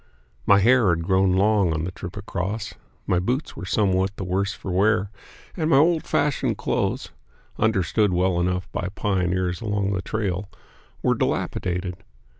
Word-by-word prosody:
My 100 - +7
hair 115 +1 +4
had 85 -1 +1
grown 95 +1 +3
long 100 -1 +3
on 80 0 -2
the 90 - -3
trip 90 +1 -8
across; 100 +1 -4 0.3
my 90 - +2
boots 125 - -2
were 95 - -7
somewhat 95 -1 +1
the - - -4
worse 95 +2 0
for 95 - -6
wear, 105 +2 +2 0.4
and 160 -3 -1
my 135 - +5
old 160 +2 +3
fashioned 145 -2 0
clothes - - -1 0.5
(understood 105 -1 +2
well 90 0 +1
enough 90 +1 -1
by 90 - -3
pioneers 90 -1 0
along 105 -2 -1
the 95 - -1
trail) 100 -2 -3 0.5
were - - +3
dilapidated. 90 0 -2
95 Hz, 155 wpm, -24 LUFS, 90-105 Hz, 0.5 s, My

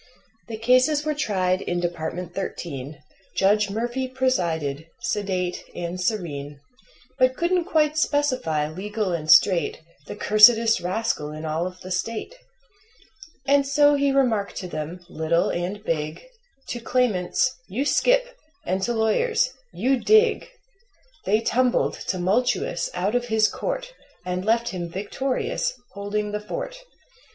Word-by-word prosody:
The 225 -2 -5
cases 255 +6 +3
were 305 - +1
tried 190 -10 0
in 175 - -2
Department 175 0 -4
Thirteen, 145 -7 -6 0.3
Judge 205 +1 +3
Murphy 240 +5 -2
presided, 170 - -1
sedate 185 -3 -2
and 175 +1 -4
serene, 145 -8 -3 0.6
But 255 0 +3
couldn't 345 0 +1
quite 310 -3 +2
specify, 255 - +1
legal 200 +4 -3
and 155 -2 -4
straight, 180 0 +5 0.3
The - - -6
cursedest 220 +2 +6
rascal 180 -5 -2
in 155 +1 -7
all 160 +3 -1
of 185 0 -10
the 185 - -8
State. 220 - -3 1.1
And 280 0 +4
so 290 +1 +5
he 280 -1 +2
remarked 240 -7 +1
to 185 - -5
them, 160 +2 -6
little 170 -1 0
and 185 +4 -3
big 155 -4 -3 0.5
To 240 - -3
claimants: 240 -2 +1
"You 240 +9 -2
skip!" - - +2 0.3
and 190 +1 -1
to 240 +5 0
lawyers: 445 - +1 0.2
"You 265 +1 +1
dig!" 435 - +4 0.8
They 215 +3 +2
tumbled, 250 +1 +1
tumultuous, 245 - 0
out 200 +4 0
of 245 0 +1
his 220 -2 +3
court - - -4 0.3
And 180 0 -2
left 230 +2 +2
him 175 -4 -5
victorious, 245 +6 -2 0.2
holding 205 +1 -3
the 210 - -2
fort. - - -6
210 Hz, 130 wpm, -24 LUFS, 180-255 Hz, 1.1 s, cursedest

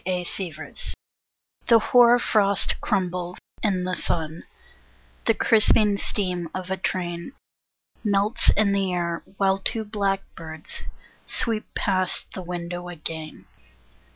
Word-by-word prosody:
ANXIETY 180 -3 -4 0.7
THE 230 - +8
hoar 240 +2 +6
frost 200 -4 +3
crumbles 180 -1 -1 0.2
in 190 -4 +1
the 185 0 -2
sun, 160 -2 -2 0.8
The 225 - +4
crisping 210 -2 +4
steam 180 -4 -2
of 185 0 -4
a 190 - 0
train 175 +3 -3 0.7
Melts 210 +3 +2
in 205 -1 +4
the 195 -1 +1
air, 170 -1 -1 0.2
while 195 -1 +2
two 220 +3 -1
black 200 -2 0
birds 160 -1 -8 0.5
Sweep 225 -3 -1
past 185 -2 0
the 185 - -5
window 175 0 -5
again. 160 -2 -6
185 Hz, 115 wpm, -25 LUFS, 175-205 Hz, 0.8 s, THE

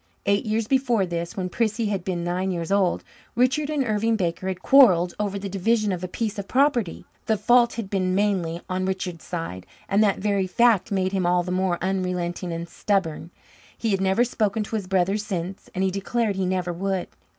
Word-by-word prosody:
Eight 200 +2 +1
years 215 0 0
before 245 -6 +2
this, 170 0 -4
when 185 -1 -1
Prissy 220 +3 -1
had 195 -3 -2
been 175 -2 -2
nine 180 +2 -1
years 170 -1 -3
old, 195 -3 +2 0.3
Richard 265 +5 +2
and 295 -3 0
Irving 220 +1 +1
Baker 185 -2 -2
had 185 -1 -4
quarrelled 185 -11 +6
over 200 -1 -1
the 200 0 -5
division 210 +2 +1
of 180 -1 -3
a - - -2
piece 215 +2 -3
of 200 - -5
property. 255 - +1 0.2
The 220 - +2
fault 240 +3 +4
had 230 -4 -4
been 185 -2 0
mainly 185 -5 0
on 185 0 -2
Richard's 185 -3 -3
side, 165 - -5 0.2
and 200 +2 +3
that 200 -2 +2
very 200 -2 0
fact 225 +1 +3
made 190 -1 0
him 190 -3 0
all 175 0 +3
the 180 - -4
more 185 -1 +1
unrelenting 180 -2 -2
and 170 +1 -4
stubborn. 170 -4 -1 0.5
He 225 - -1
had 195 -1 +1
never 190 +5 +3
spoken 220 -3 0
to 215 - -5
his 205 -4 -3
brother 190 +1 +1
since, 190 -3 -5
and 185 - 0
he 190 - +1
declared 205 +2 -1
he 190 -1 -1
never 180 -1 -1
would. 190 +1 -2
195 Hz, 205 wpm, -24 LUFS, 180-215 Hz, 0.5 s, quarrelled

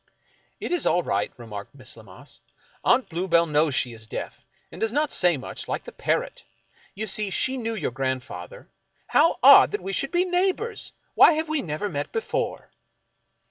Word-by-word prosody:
" - - -38
It - - -5
is 355 - +2
all 175 - +2
right," 100 -5 -1
remarked 110 -1 -9
Miss 130 -3 -7
Lammas. 105 -5 -15 0.2
" - - -32
Aunt 245 +2 +3
Blue 175 +2 -3
bell 170 -1 +4
knows 150 -2 +1
she 125 -2 -1
is 110 -1 -12
deaf, - - -7 0.3
and - - -11
does 225 -1 +1
not 295 +3 0
say 175 -4 +3
much, 130 - -7
like - - -3
the - - -10
par - - 0
rot. - - -10 0.5
You 215 +2 -3
see, 210 0 +2
she 260 +7 -1
knew 230 -3 -3
your 195 - -2
grandfather. 130 - -5 0.4
How 320 +3 +3
odd - - +9
that 420 - -3
we 195 - -4
should 275 +7 -1
be 355 +1 +2
neighbors! 380 +5 -1 0.2
Why - - +7
have 315 +1 -2
we 310 -2 0
never 155 +5 -3
met 145 -7 -4
before 470 +2 -3
195 Hz, 195 wpm, -24 LUFS, -, 0.5 s, odd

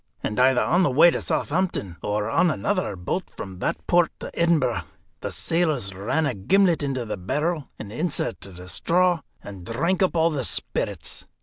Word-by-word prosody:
And 105 - -2
either 130 0 +4
on 175 +3 +2
the 180 - +3
way 150 +6 +6
to - - -2
Southampton, 155 - -1
or 105 0 -1
on 165 +9 +3
another 100 -5 -1
boat 95 - -3
from 95 -2 -7
that - - -2
port 175 -2 +3
to - - -6
Edinburgh, 170 -2 +2 0.4
the - - -4
sailors 155 - +1
ran 110 +12 -1
a 140 - 0
gimlet 175 - +2
into 135 -4 -2
the 105 - -4
barrel, 150 - -2
and 105 - -8
inserted 120 - -3
a 90 0 -10
straw, 175 - +2 0.2
and 100 -3 -9
drank 165 - -1
up 185 -2 +2
all 165 0 +3
the 140 -4 -2
spirits. - - -1
140 Hz, 180 wpm, -24 LUFS, 105-170 Hz, 0.4 s, way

